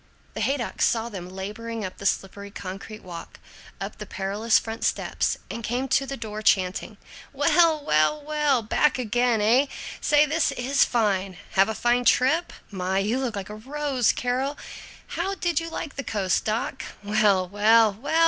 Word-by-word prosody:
The - - -4
Haydocks 270 -3 0
saw 230 0 0
them 185 -5 -7
laboring 210 +4 -5
up 185 - -7
the 200 - 0
slippery 200 +2 -2
concrete 200 +2 -8
walk, 175 -2 -9 0.4
up - - -6
the - - -7
perilous 205 +4 +1
front 225 0 -4
steps, - - 0
and 230 - -6
came 245 +4 -1
to 275 +1 +2
the 275 - -4
door 215 -2 -6
chanting: 195 +1 +1 0.4
"Well, 310 +1 +3
well, 155 - +3
well, 295 -4 +1
back 275 +6 +2
again, 240 -1 +1
eh? 245 +7 +4 0.3
Say, 295 0 +4
this 310 +2 +1
is 265 +3 +2
fine! 195 -5 0
Have 195 +2 +4
a 220 - -2
fine 245 +2 +1
trip? 305 +10 +3 0.2
My, 190 -1 -1
you 210 +6 +1
look 255 -5 -2
like 200 0 -5
a - - -6
rose, 265 +1 0
Carol. 260 +3 -1 0.5
How 390 +3 -3
did 345 -5 0
you 330 0 -5
like 320 -3 -6
the 280 - -3
coast, 200 -6 0
doc? 220 +3 -2 0.2
Well, 205 -3 +3
well, 215 +2 +4
well! 230 +10 -7
230 Hz, 170 wpm, -25 LUFS, 200-275 Hz, 0.5 s, eh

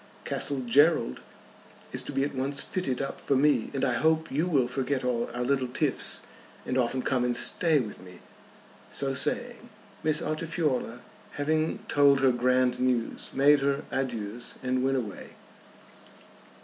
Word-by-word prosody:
Castle 140 -2 -1
Gerald 140 - +3 0.7
is - - -1
to - - -6
be 135 - 0
at 145 - -2
once 135 +2 0
fitted 135 -9 -2
up 135 - -6
for 140 - +1
me, 145 +3 +3
and 135 -1 -1
I 125 - +1
hope 160 +4 +1
you 155 +6 0
will 135 -8 +2
forget 130 +1 -2
all 120 -2 -1
our 120 +1 -3
little 130 0 +1
tiffs, 125 - +1 0.4
and 130 - -2
often 130 0 0
come 130 -2 +1
and 125 -1 +1
stay 160 +1 +3
with 110 -5 -5
me." 90 -1 -13 0.7
So 135 -1 0
saying, 240 - -2 0.3
Miss 155 -1 +1
Altifiorla, 155 -6 -2 0.3
having 155 +2 -1
told 140 -1 +4
her 135 -1 +5
grand 125 0 +2
news, 125 -3 -1
made 145 +2 +5
her 140 +1 0
adieus 120 -3 -3
and 130 0 0
went 135 0 +1
away. 110 -6 -6
135 Hz, 155 wpm, -28 LUFS, 125-145 Hz, 0.7 s, her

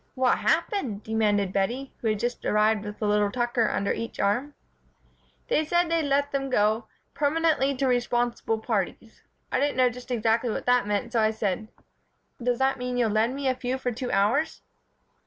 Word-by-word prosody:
"What 255 -1 +2
happened?" 320 - 0
demanded 210 -3 +1
Bettie, 240 +8 -1
who 230 - -1
had 215 -1 +1
just 240 +3 -3
arrived 210 0 +2
with 210 0 -7
a - - +2
little 210 0 +2
Tucker 240 0 +1
under 200 - 0
each 230 - -6
arm. 245 +9 0 0.9
"They 315 - +2
said 345 +2 +1
they'd 335 -1 +2
let 285 +1 +1
them 275 -1 -2
go 215 -1 +1 0.3
'permanently 295 -2 +1
to 270 - 0
responsible 240 -2 0
parties.' 220 0 -3 0.3
I - - +1
didn't 285 -1 0
know 255 -1 +4
just 250 +2 -11
exactly 230 0 +1
what - - -3
that 245 -3 +3
meant, 210 +3 -2
so 230 - +3
I 215 - +4
said: 215 -1 -2 0.7
'Does 245 0 +1
that 265 +1 +1
mean 250 0 -3
that - - 0
you'll 230 - +2
lend 225 +4 +1
me 280 -1 -2
a 260 - +3
few 255 +1 -3
for 255 -1 -2
two 245 +2 -4
hours?'" 215 +11 +1
240 Hz, 190 wpm, -26 LUFS, 215-270 Hz, 0.9 s, know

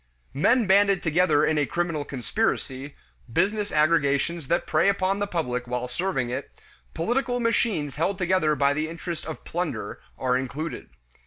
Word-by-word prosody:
Men 230 - +3
banded 195 -1 +4
together 160 -2 +3
in 155 -1 +2
a 145 - +1
criminal 170 -4 -1
conspiracy, 140 - -2 0.4
business 205 - +1
aggregations 155 0 +2
that 170 - +1
prey 185 - +3
upon 195 0 +1
the 205 - -1
public 125 -9 -2
while 125 0 -2
serving 130 -2 -2
it, 130 +3 -4 0.5
political 245 +6 0
machines 215 - 0
held 180 +5 0
together 180 -5 +2
by 140 0 +3
the 155 +2 -2
interest 165 -1 -6
of 160 - -7
plunder, 175 -1 -4 0.2
are 125 -1 +1
included. 140 +5 -5
165 Hz, 150 wpm, -25 LUFS, 140-190 Hz, 0.5 s, banded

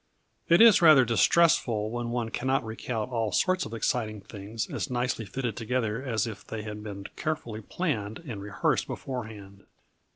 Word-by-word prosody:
_ - - -7
It - - +6
is 225 -5 +8
rather 155 -6 +8
distressful 115 -4 +3
when 120 0 -3
one 120 -1 -2
cannot 130 +1 0
recount 110 +1 -4
all 115 -3 -1
sorts 185 - +1
of - - -10
exciting 110 -1 -1
things 105 +2 -6
as - - -4
nicely 125 -2 -1
fitted 120 +1 -3
together 115 -1 -1
as 115 -6 -1
if 110 -4 -7
they 110 -1 -6
had 105 -1 -6
been 100 -2 -7
carefully 120 -9 -3
planned 110 - -3
and 120 -12 -7
rehearsed 100 0 0
beforehand. 105 -6 -7
115 Hz, 165 wpm, -28 LUFS, 105-130 Hz, -, is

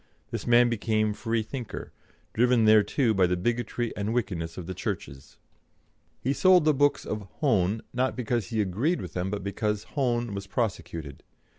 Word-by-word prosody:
This - - -4
man 120 0 +6
became 110 -2 0
Free 115 +2 -1
thinker, 120 +1 -7 0.4
driven 120 -1 +3
thereto 110 +3 +4
by 95 -3 +3
the 90 0 0
bigotry 120 +3 -1
and 105 +3 -2
wickedness 90 -8 -2
of 90 - -6
the 95 - -5
Churches. 70 -5 -6 0.8
He 135 - 0
sold 180 +1 +5
the 155 - +5
books 145 +1 +2
of 105 -2 -4
Hone 110 - +1
not 130 +1 0
because 120 -4 -1
he 110 -1 0
agreed 110 - 0
with - - -7
them, 90 +1 -2
but 100 -1 -4
because 105 +1 -2
Hone 120 -5 0
was 100 0 -5
prosecuted. 85 - -3
110 Hz, 165 wpm, -27 LUFS, 100-120 Hz, 0.8 s, man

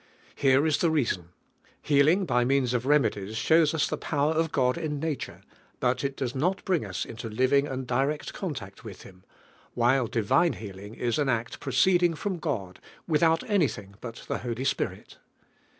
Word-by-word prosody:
Here. 135 +1 +3
is 150 -3 +2
the 170 - +3
reason. 115 - 0 0.5
Heal 140 -1 +3
ing 185 +4 +3
by 125 -7 +2
means 130 -1 +1
of 125 +1 -1
remedies 110 -8 +1
shows 160 +3 +4
us 155 - +2
the - - -3
power 150 0 0
of 160 0 0
God 125 -2 +2
in 155 -3 -3
nature; 155 -2 -4 0.4
but 125 +1 0
it 140 0 -2
does 130 -2 -2
not 175 +8 -1
bring 180 - +1
us 95 -4 -4
into 115 0 -7
living 130 +5 +2
and 130 -2 -4
direct 135 +5 -1
contact 120 - -6
with 105 -5 -10
Him; 90 -1 -15 0.5
while 120 +1 +3
divine 130 +10 +2
healing 100 0 -9
is 120 +3 -1
an 145 -2 +1
act 115 -1 -2
proceeding 170 +6 +3
from 185 +2 -3
God, 95 - -4 0.3
without 165 0 +2
anything 145 - 0
but 115 -2 -8
the - - -2
Holy 120 +1 -4
Spirit. 135 - -3
135 Hz, 175 wpm, -27 LUFS, 115-155 Hz, 0.5 s, shows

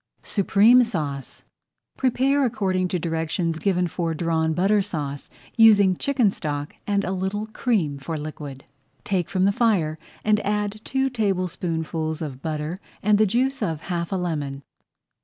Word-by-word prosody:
SUPREME 215 +5 +5
SAUCE 150 - -4 0.5
Prepare 270 +2 +2
according 190 -6 0
to 180 - -1
directions 165 0 -2
given 180 -2 +1
for 165 -1 -2
Drawn 160 0 0
Butter 200 +4 +3
Sauce, 145 -6 -5 0.3
using 205 -4 +6
chicken 255 -2 +2
stock 145 -4 -4
and 200 -1 +1
a 185 - -2
little 190 +3 -2
cream 210 - -1
for 160 +4 -4
liquid. 150 -3 -7 0.4
Take 185 -5 -1
from 185 -1 +1
the 200 - +4
fire, 190 -9 +1 0.3
and 210 0 +4
add 210 0 -2
two 265 0 0
tablespoonfuls 170 -7 -1
of 140 -5 -6
butter 155 +3 -3 0.2
and 210 -1 +4
the 215 - +5
juice 260 +6 0
of 160 -2 -2
half 170 -1 -3
a - - 0
lemon. 145 -6 -3
185 Hz, 145 wpm, -24 LUFS, 160-210 Hz, 0.5 s, using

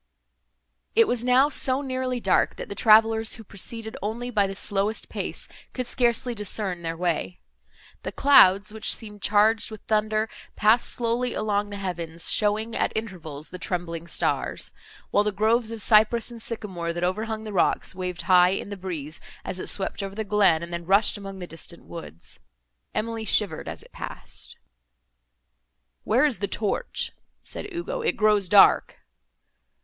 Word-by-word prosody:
It 455 -1 +6
was 240 -1 +1
now 255 +3 +4
so 265 -1 +2
nearly 255 -2 -2
dark, - - +2
that - - -7
the - - -4
travellers, 220 +1 +4
who 225 - -11
proceeded 220 +3 -4
only 235 +5 -3
by 205 -4 +2
the 195 - -6
slowest 205 +2 -1
pace, - - -4 0.3
could 255 - -3
scarcely 240 0 +1
discern 205 -4 -1
their 165 -1 -4
way. 175 0 -2 0.6
The - - -5
clouds, 205 -7 +5
which 220 0 0
seemed 210 -2 -9
charged 215 +2 +3
with 215 -2 -9
thunder, 215 0 0 0.3
passed 220 +3 +4
slowly 240 +1 -1
along 205 -1 0
the 205 - -6
heavens, 170 -4 -3
showing, 215 +2 +1
at - - +1
intervals, 165 -9 -5
the 180 - -7
trembling 170 -2 -4
stars; - - -1 0.4
while 205 - +4
the 210 - 0
groves 220 +3 +1
of 225 -3 -4
cypress 220 +2 +4
and 235 -1 -8
sycamore, 190 -8 -4
that 175 +1 -4
overhung 215 +4 -2
the 215 -1 -7
rocks, 180 - +1
waved 180 -1 -4
high 180 -1 +6
in 195 +1 -3
the 200 - -6
breeze, 165 -5 -6 0.2
as 185 - -4
it - - -5
swept 195 +1 -1
over 195 0 -5
the 220 - -2
glen, 200 -6 +3
and 170 0 -7
then 170 0 -3
rushed 200 +4 +4
among 195 -2 -8
the 180 - -6
distant 170 0 -8
woods. 165 - -10 0.6
Emily 225 +1 -2
shivered 205 -6 +1
as - - -7
it - - -19
passed. - - -8 1.5
"Where 245 +7 +4
is 270 -10 +1
the 200 - -1
torch?" 210 -1 -2 0.3
said 410 - -7
Ugo, 440 +9 -4
"it 465 - 0
grows 210 -3 +3
dark." 205 -1 +6
210 Hz, 165 wpm, -25 LUFS, 185-225 Hz, 1.5 s, It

